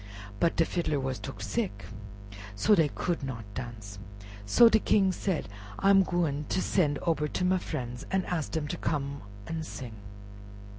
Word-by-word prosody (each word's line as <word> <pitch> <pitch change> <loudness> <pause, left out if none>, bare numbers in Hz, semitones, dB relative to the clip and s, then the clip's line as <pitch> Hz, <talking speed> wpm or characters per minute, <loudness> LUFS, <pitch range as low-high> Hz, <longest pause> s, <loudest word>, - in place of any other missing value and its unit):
But 165 - +2
de 165 - +3
fiddler 160 -5 -1
was 130 -1 -2
took 105 0 -7
sick, 100 -2 -2 0.7
so 210 - +4
dey 165 -6 +5
could 175 -2 -1
not 125 -5 -5
dance. 105 -5 -7 0.5
So 230 - +7
de 220 -1 +5
King 195 -3 +3
said, 185 -3 -2 0.3
"I 195 - +4
am 195 -1 +7
gwine 165 -6 0
ter - - +1
sen' 155 -6 +2
ober 155 -3 +1
ter 180 - -1
my 185 0 +3
frien's 120 -6 -5
an' 190 -1 +1
ask 165 -5 -2
dem 155 -2 -1
ter - - -3
come 140 -2 -2 0.2
an' 160 +4 -3
sing." 130 -6 -7
150 Hz, 175 wpm, -29 LUFS, 130-180 Hz, 0.7 s, So